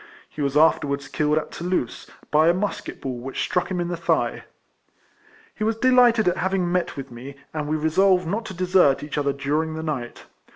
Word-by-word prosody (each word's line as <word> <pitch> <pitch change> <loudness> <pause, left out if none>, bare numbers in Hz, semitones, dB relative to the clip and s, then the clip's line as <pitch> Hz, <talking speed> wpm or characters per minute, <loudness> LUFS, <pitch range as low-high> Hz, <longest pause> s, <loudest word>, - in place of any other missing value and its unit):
He 150 - -8
was 140 0 0
afterwards 140 -3 +2
killed 150 +1 0
at 155 - -2
Toulouse, 175 -8 -3 0.2
by 155 +2 +4
a 170 - +4
musket 205 +2 -4
ball 130 -3 -4
which 130 +2 -4
struck 180 - -1
him 185 -2 -2
in 175 - -1
the 175 - -2
thigh. 170 0 -1 1.1
He 215 - -5
was 220 +1 0
delighted 245 -3 +4
at 180 - +2
having 190 -2 0
met 180 -4 -1
with 135 - -7
me, 130 +4 -9 0.2
and 150 -2 -3
we 155 +1 0
resolved 180 +4 +3
not 210 +7 -2
to 190 - -7
desert 180 -6 +3
each 150 0 -3
other 140 -1 +1
during 150 +3 -1
the 160 - -5
night. 130 -7 -5
160 Hz, 200 wpm, -23 LUFS, 145-185 Hz, 1.1 s, by